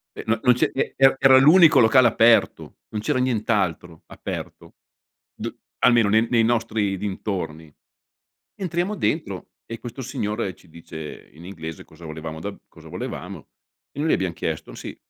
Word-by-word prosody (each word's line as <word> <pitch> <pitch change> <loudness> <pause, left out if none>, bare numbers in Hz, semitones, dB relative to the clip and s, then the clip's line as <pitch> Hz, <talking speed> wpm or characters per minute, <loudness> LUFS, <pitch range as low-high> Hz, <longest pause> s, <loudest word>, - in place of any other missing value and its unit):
Eh - - -7
no 115 +1 +1
non 125 -1 +5
ce 125 - +1
e 135 - -1
era 135 0 +5
era 135 -1 +7
l'unico 155 0 +7
locale 120 +2 +6
aperto, 115 0 +2
non 105 - -4
c'era 110 - -1
nient'altro 105 -9 -1
aperto; - - -8 0.6
d - - -5 0.3
almeno 120 -4 +4
nei 110 +2 +3
nei 115 -2 +3
nostri 110 -4 0
dintorni. 90 -6 -5 0.8
Entriamo 180 +2 -2
dentro 100 - -2
e 115 -1 -8
questo 120 +2 -8
signore 110 -6 -3
ci 90 - -22
dice 80 -2 -10
in 80 +4 -14
inglese 80 -4 -8
cosa 80 +1 -16
volevamo 80 0 -7
da 100 - -4
b - - -16
cosa - - -15
volevamo. - - -7 0.4
E 145 - -6
noi 155 - 0
gli - - +3
abbiam 95 -2 0
chiesto: 80 -1 -5
"Sì, - - -8
110 Hz, 165 wpm, -23 LUFS, 85-125 Hz, 0.8 s, era